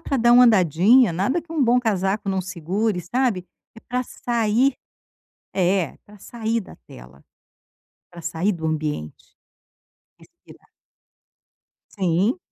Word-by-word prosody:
pra 280 - -2
dar 240 -1 +4
uma 250 +1 +8
andadinha. 205 - +4
Nada, 200 - 0
que 330 - -12
um 315 -3 +1
bom 245 0 +4
casaco 200 -2 -1
não 190 -1 0
segure, 185 +3 -2
sabe. 210 0 -1 0.3
É - - -12
pra 250 +2 -3
sair 240 +2 0 0.8
É. 185 -3 0
Pra 210 0 -16
sair 230 +2 -3
da - - -14
tela, 65 +3 -15 0.9
pra 175 -1 -11
sair 170 +4 -1
do 165 -4 -5
ambiente. 150 - -4 0.8
Respirar. - - -20 1.3
Sim. 190 - 0
200 Hz, 125 wpm, -22 LUFS, 175-240 Hz, 1.3 s, uma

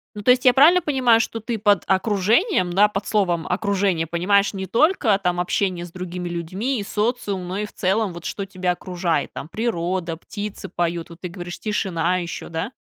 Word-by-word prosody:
Ну, 205 - -6
то 250 - +5
есть 250 +2 +2
я 250 - +7
правильно 330 +7 +6
понимаю, 255 -7 +3
что 225 -1 -2
ты 225 -1 -3
под 205 -3 +3
окружением, 200 - +2
да, 205 +4 +5
под 200 -1 -4
словом 175 -6 +1
"окружение" 190 -4 0
понимаешь 200 +5 +2
не 190 -1 -4
только 235 - +2
там 180 -1 0
общение 180 -1 -1
с 170 - -12
другими 180 -1 -5
людьми 190 +9 -2
и - - -3
социум, 210 -4 -1
но 190 - -3
и, 210 - -2
в - - -13
целом, 195 0 0
вот 170 0 -9
что 200 - -4
тебя 185 -2 -2
окружает, 175 -4 -2
там 150 - -7
природа, 180 -6 -2
птицы 205 +2 -7
поют, 170 -1 -2
вот 170 +1 -13
ты 180 - -5
говоришь, 175 0 -8
тишина 185 -5 0
еще, 170 0 -6
да? 165 +8 -4
190 Hz, 195 wpm, -22 LUFS, 175-215 Hz, -, я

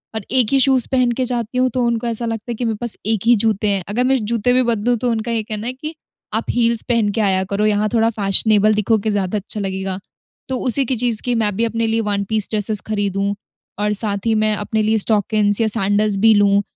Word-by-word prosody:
और 220 - -4
एक 255 -4 +3
ही 275 - +3
शूज़ 260 -2 +3
पहन 255 -2 +2
के 260 - 0
जाती 240 -1 -3
हूँ, 255 0 +2
तो 250 +1 -2
उनको 235 0 -1
ऐसा 235 0 -2
लगता 225 +1 -4
है - - -3
कि 240 +2 -4
मेरे 225 - -1
पास 235 -2 -2
एक 220 -2 0
ही 240 +1 +5
जूते 215 -1 0
हैं, 195 -2 0
अगर 240 +5 0
मैं 265 +1 +2
जूते 235 +2 0
भी 255 - +3
बदलूँ, 235 +2 +1
तो 245 +2 -1
उनका 225 +1 -2
ये 225 -2 -1
कहना 215 +1 -6
है 250 - -3
कि 305 +5 -7 0.4
आप 220 +1 -1
हील्स 235 -1 +1
पहन 230 -4 +2
के 220 - +1
आया 190 -2 +1
करो, 205 +1 0
यहाँ 210 0 +1
थोड़ा 225 0 +3
फैशनेबल 210 0 +3
दिखोगे 215 0 0
ज़्यादा 200 0 -1
अच्छा 210 +1 -5
लगेगा। 190 -1 -4 0.5
तो 260 - -1
उसी 265 +2 +1
की 255 - -1
चीज़ 235 -2 -1
की 245 -1 0
मैं 205 -2 -1
भी 230 +3 0
अपने 230 0 -1
लिए 225 +1 0
वन 200 0 -1
पीस 215 -2 0
ड्रेसेज़ 210 -1 0
खरीदूँ 200 -1 -1 0.5
और 210 0 0
साथ 205 -1 +2
ही 225 - +2
मैं 215 0 +1
अपने 215 +2 -2
लिए 220 +1 +2
स्टॉकिन्स 210 0 +1
या 225 - +2
सैंडल्स 205 -1 +1
भी 220 +2 +5
लूँ। 200 -1 +3
220 Hz, 245 wpm, -18 LUFS, 205-235 Hz, 0.5 s, ही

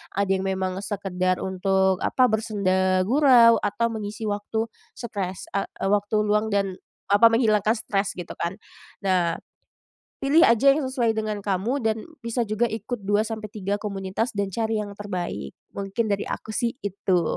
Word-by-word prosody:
ada 200 0 +1
yang 190 0 +1
memang 190 -1 -1
sekedar 185 -3 -1
untuk, 190 0 +1
apa, 255 -3 +2
bersenda 190 -4 +1
gurau 240 -1 +6
atau 220 +3 0
mengisi 215 0 -5
waktu 210 +1 -1 0.3
stres, 195 -6 -4
a 200 - -1 0.2
waktu 205 +1 +2
luang 210 +1 +1
dan, 200 -3 -1 0.3
apa, 205 +3 +7
menghilangkan 220 -2 +3
stres 200 -3 -2
gitu 175 - -7
kan. 170 +2 -2 0.5
Nah, 180 -3 +2 0.8
pilih 285 +4 +4
aja 270 +4 +6
yang 305 - -1
sesuai 250 -4 0
dengan 215 -1 -2
kamu 205 +8 0
dan 220 -2 -1 0.2
bisa 235 +1 0
juga 215 +2 0
ikut 225 +2 -4
2 205 +1 +3
sampai 220 -1 -5
3 200 -1 -2
komunitas 200 +2 -3
dan 200 -1 -1
cari 220 +1 -1
yang 205 -1 -9
terbaik. 180 - -4 0.2
Mungkin 200 +3 -2
dari 200 0 -1
aku - - -5
sih 235 +2 -1
itu. 190 -3 0
205 Hz, 155 wpm, -24 LUFS, 190-225 Hz, 0.8 s, apa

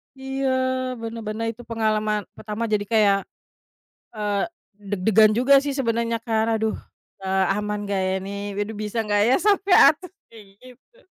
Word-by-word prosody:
Iya 265 0 -3 0.5
benar-benar 225 -1 -5
itu 230 +2 -13
pengalaman 215 -2 0
pertama 215 +1 -5
jadi 205 -1 +1
kayak, 205 -3 +4 1.0
eee, 205 -2 -1 0.5
deg-degan 210 +2 +4
juga 255 +4 +3
sih 280 0 -3
sebenernya 230 -3 0
kan, 220 -2 0
aduh, 220 0 -1 0.4
eee, 190 0 0
"Aman 210 0 -3
gak 200 -1 -2
ya - - 0
ini? 195 - -6 0.2
Waduh 205 +2 -3
bisa 210 +2 -5
gak 205 -1 +1
ya 255 - +4
sampai 400 -2 +3
atas?" 350 +4 +5 0.2
Kayak 220 -2 -14 0.3
gitu. 475 - -32
220 Hz, 145 wpm, -23 LUFS, 210-235 Hz, 1.0 s, atas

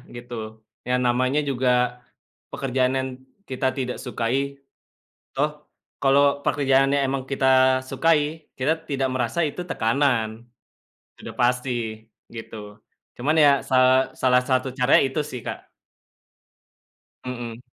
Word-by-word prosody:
gitu. 110 -2 -8 0.2
Ya 125 - +2
namanya 125 +3 +1
juga 130 -2 -1 0.8
pekerjaan 130 -1 0
yang 130 0 -1 0.4
kita 130 0 -1
tidak 125 -1 -3
sukai, 135 +3 -3 0.7
toh 150 +3 0 0.5
kalau 140 +1 +3
pekerjaannya 135 0 +2
emang 135 0 -2
kita 135 -1 0 0.4
sukai 155 -1 0
kita 135 +5 +2 0.2
tidak 135 -1 0
merasa 125 +6 -1
itu 175 +5 -6
tekanan. 115 -2 0 0.7
Sudah - - -9
pasti 125 +1 +1 0.6
gitu. 105 -2 -9 0.4
Cuman 145 +6 0
ya 145 - +7 0.2
sa 130 - 0 0.5
salah 125 -1 +4
satu 130 0 +2
caranya 125 +1 +5
itu 135 - -3
sih - - -6
Kak. - - -7 1.6
Mhm. 120 -2 -6
130 Hz, 110 wpm, -23 LUFS, 120-140 Hz, 1.6 s, ya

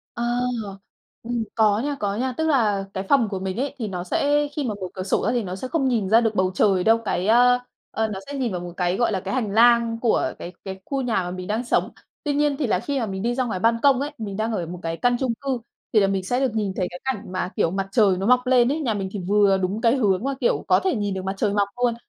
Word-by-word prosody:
Ờ, 235 - -3 1.0
ừm, 235 -1 -2
có 215 -2 +3
nha, 285 +3 -1
có 200 -1 -1
nha. 255 +3 -1
Tức 320 - 0
là 215 -9 +2
cái 190 - -3
phòng 265 -6 +4
của 195 -2 -3
mình 190 0 -3
ấy, 275 +3 -2
thì 225 -4 -3
nó 180 -2 -4
sẽ 290 +9 +1
khi 295 - -1
mà 220 -5 -2
mở 185 - -3
cửa 185 - -4
sổ 185 - 0
ra 230 - +2
thì 245 - 0
nó 185 -2 -5
sẽ 255 - -6
không 275 -3 0
nhìn 220 -6 0
ra 225 +1 +6
được 225 -2 0
bầu 185 -1 +2
trời 190 -3 +2
đâu, 225 +1 +5
cái, 185 -2 -1
a, 245 +2 +5 0.3
ờ, 220 0 -1
nó 195 -2 -5
sẽ 285 - -7
nhìn 245 -5 -1
vào 180 - -3
một 175 -1 -7
cái, 180 0 0
gọi 235 -3 +1
là, 190 - -1
cái 195 +1 -4
hành 230 -6 -1
lang 235 +1 +4
của 230 -2 +1
cái 175 - -7
cái 190 -1 -6
khu 275 -1 -2
nhà 245 -3 -1
mà 180 -1 0
mình 185 0 -6
đang 220 +4 -2
sống, - - +1 0.3
tuy 290 - 0
nhiên 290 -1 +1
thì 280 - -1
là 200 - +1
khi 280 +4 -2
mà 230 - -1
mình 190 -1 -4
đi 240 +1 0
ra 255 0 0
ngoài 220 -6 -3
ban 230 +4 +3
công 275 -2 +4
ấy, 290 +2 -2
mình 200 -3 -5
đang 220 +1 -1
ở 180 -6 -2
một 175 +2 -7
cái 165 0 -3
căn 245 +4 +2
chung 255 -3 0
cư, 270 -3 -1 0.3
thì 215 - +5
là 195 - +4
mình 195 -1 -1
sẽ 245 +7 -1
được 260 -5 0
nhìn 210 -3 -1
thấy 185 - 0
cái 180 - -9
cảnh 260 -6 -2
mà, 185 -1 -2
kiểu, 170 -6 +2
mặt 195 +1 -3
trời 200 -4 +4
nó 195 - -2
mọc 250 +1 +3
lên 250 +1 +4
ấy. 315 - -2
Nhà 235 -8 0
mình 195 -2 -3
thì 205 - -4
vừa 200 -1 +4
đúng 190 +3 -2
cái 235 +1 +3
hướng 200 -3 +1
mà, 275 0 -1
kiểu, 240 - +1
có - - +5
thể 375 -6 0
nhìn 205 -3 -2
được 190 0 -5
mặt 190 +1 -2
trời 205 0 0
mọc 200 -1 +1
luôn 240 -2 +3
220 Hz, 300 wpm, -23 LUFS, 195-250 Hz, 1.0 s, ra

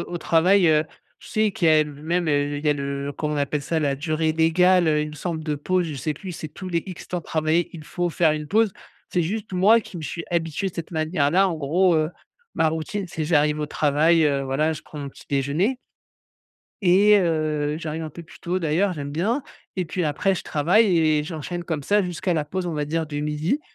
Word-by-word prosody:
au 175 - -2
travail, 175 +4 +4
heu, 155 0 +4 0.4
je - - -13
sais 215 -1 +1
qu'il 175 -3 +1
y - - +6
a 155 -1 +5
le 150 - -9
même 170 +2 0
il 145 0 0
y - - +3
a - - +5
le, 140 0 -4
comment 150 -1 -2
on - - -2
appelle 145 0 -1
ça? 160 +3 -1
La 145 -3 +1
durée 155 +2 -1
légale, 170 +2 +4
heu, 150 -1 +2
il 150 - -5
me 150 - -10
semble, 160 0 -4
de 155 -2 -1
pause. 180 +5 0
Je 155 - -5
sais 140 +3 -2
plus. 185 +5 -8
C'est 160 -1 -6
tous 185 +5 -8
les 170 -2 0
X 185 -3 -9
temps 180 - -2
travaillés, 160 +1 0
il 160 -3 -9
faut 175 +2 -2
faire 165 -1 +3
une 150 -1 -4
pause. 220 +1 +3 0.4
C'est 175 - +1
juste 205 +5 -4
moi 200 +6 +5
qui 195 - -11
me 165 - -6
suis 165 +2 -5
habitué 170 +2 -1
de 185 - -13
cette 165 - -6
manière-là. 160 +2 +2
En 175 - -2
gros, 165 +5 +2
heu, 155 0 +1 0.4
ma 160 - +3
routine, 160 +5 -3
c'est, 170 -3 -4
j'arrive 150 -1 +2
au 150 - -1
travail, 155 +3 +3
heu, 140 -2 +1
voilà, 135 +4 0
je 155 -1 -8
prends 150 - -11
mon 140 -1 -5
petit-déjeuner 145 - -1 1.1
et 200 +3 +6
heu, 155 -4 0
j'arrive 160 0 -4
un 155 - -5
peu 170 - -10
plus 165 - -16
tôt 180 +2 -1
d'ailleurs, 175 +4 +1
j'aime 145 -4 -5
bien. 215 - 0 0.3
Et 185 - 0
puis 175 +2 -2
après 160 +6 +1
je 175 - -5
travaille 175 +10 +3
et 155 -2 +2
j'enchaîne 170 +2 -5
comme 160 -4 -3
ça 205 +8 +2
jusqu'à 180 0 -2
la 155 -2 0
pause, 180 +4 -4
on 170 - -3
va 150 -1 -1
dire, 160 +2 -2
du 145 -1 -4
midi, 150 - -1
160 Hz, 235 wpm, -23 LUFS, 150-180 Hz, 1.1 s, y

